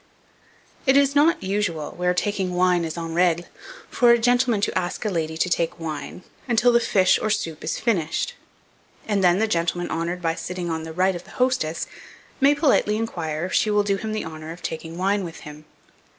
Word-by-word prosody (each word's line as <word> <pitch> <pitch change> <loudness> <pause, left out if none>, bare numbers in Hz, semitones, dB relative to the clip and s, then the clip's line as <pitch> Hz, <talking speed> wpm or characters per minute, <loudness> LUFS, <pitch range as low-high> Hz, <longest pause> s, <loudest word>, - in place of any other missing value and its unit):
It 265 +1 +6
is 280 0 +4
not 315 +4 +3
usual, 190 -6 -2
where 180 0 0
taking 190 -2 -1
wine 180 -1 +3
is 160 +1 -5
en 165 -1 -4
règle, 175 0 +2 0.4
for 245 - +3
a 235 - +7
gentleman 245 -1 +2
to 205 - -1
ask 180 +3 -2
a 210 - 0
lady 160 -2 -2
to 170 - +1
take 170 -1 -1
wine 160 +2 -6 0.2
until 245 0 +4
the 235 - +5
fish 190 -5 +3
or 215 - 0
soup 165 -7 -2
is 155 - -2
finished, 195 - 0 0.7
and 205 -3 +1
then 175 0 +5
the 220 +2 +1
gentleman 175 -2 -1
honoured 170 +2 -2
by 165 -1 +1
sitting 175 0 -4
on 160 0 -2
the 160 - -7
right 185 +3 +1
of 175 - -8
the - - -16
hostess, 250 -11 0 0.5
may 280 +1 +5
politely 280 -8 +2
inquire 170 -8 -3
if 185 - -6
she 215 - +2
will 210 0 +3
do 200 -1 0
him 220 +2 -4
the 215 - -3
honour 155 0 -8
of 175 +1 -11
taking 160 +1 -5
wine 195 +2 +1
with 165 -2 -8
him. 150 +1 -11
180 Hz, 205 wpm, -23 LUFS, 165-215 Hz, 0.7 s, a